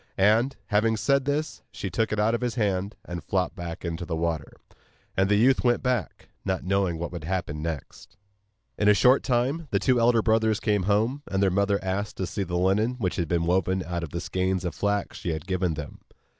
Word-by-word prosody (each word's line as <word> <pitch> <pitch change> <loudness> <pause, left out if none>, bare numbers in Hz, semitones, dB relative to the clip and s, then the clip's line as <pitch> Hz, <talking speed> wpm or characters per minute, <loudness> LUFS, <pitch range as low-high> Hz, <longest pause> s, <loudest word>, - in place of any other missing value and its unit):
And, 110 +7 +3
having 110 +1 +2
said 140 +3 +2
this, 145 +2 -2
she 100 - -5
took 110 +5 0
it 110 - -1
out 110 +2 +3
of 120 - -1
his 125 -1 -1
hand, 100 -3 -1
and 85 -2 -6
flopped 95 +2 -1
back 85 -1 -6
into 85 0 -3
the 85 -1 -3
water, 80 -3 -2 0.6
and 95 +1 +2
the 105 - +4
youth 125 +5 +4
went 120 -1 +2
back, 125 - -2
not 95 -2 -1
knowing 95 -2 +1
what 85 +1 -4
would 85 -3 -6
happen 85 -4 -2
next. 80 -4 -6 0.6
In 105 - +2
a 105 - +6
short 125 +6 +5
time 135 +6 0
the - - +1
two 130 -2 +2
elder 115 -1 +4
brothers 110 -1 +2
came 105 -3 +1
home, 115 +8 +1
and 95 0 +1
their 95 - +3
mother 100 +1 +2
asked 95 +2 -2
to 95 - -1
see 100 - -4
the 90 -2 -2
linen 100 +6 +2
which 95 -8 -2
had 85 - -1
been 85 +1 0
woven 95 +1 +1
out 85 -1 -3
of 85 - -5
the 85 - -4
skeins 95 0 -1
of 85 - -2
flax 100 0 -1
she 85 - -2
had 80 +2 -5
given 90 -3 0
them. 75 -3 -7
100 Hz, 220 wpm, -26 LUFS, 90-115 Hz, 0.6 s, a